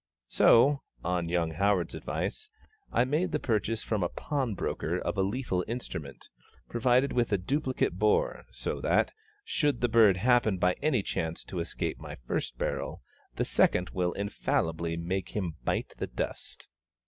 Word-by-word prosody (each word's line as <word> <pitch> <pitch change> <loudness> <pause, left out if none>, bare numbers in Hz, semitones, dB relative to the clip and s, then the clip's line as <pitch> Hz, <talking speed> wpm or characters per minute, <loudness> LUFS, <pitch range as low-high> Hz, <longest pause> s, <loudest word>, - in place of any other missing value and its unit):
So, 140 +4 +5 0.2
on 90 -1 -1
young 85 -2 +1
HOWARD'S 95 0 +1
advice, 430 -1 -4 0.4
I 120 - +3
made 160 +7 0
the 150 - 0
purchase 110 -2 0
from 110 -3 -1
a 85 - +1
pawnbroker 130 -9 -2
of - - -2
a 95 - +1
lethal 95 -2 -1
instrument, 80 - -5 0.4
provided 125 +3 +2
with 120 -2 +1
a 100 - +4
duplicate 130 - -1
bore, 105 0 +2
so - - -3
that, - - +2 0.3
should 145 -6 0
a - - +5
bird 110 -5 +6
happen 115 -1 +3
by 90 0 +3
any 130 -9 +2
chance 80 -2 -3
to 90 - -5
escape 85 - -3
my - - -7
first - - -3
barrel, - - -3 0.3
the - - 0
second 90 0 +2
will 90 -1 0
infallibly 85 -4 -1
make 90 +2 -3
him 90 -6 -2
bite - - -1
the - - -2
dust. - - -5
100 Hz, 155 wpm, -29 LUFS, 90-125 Hz, 0.4 s, bird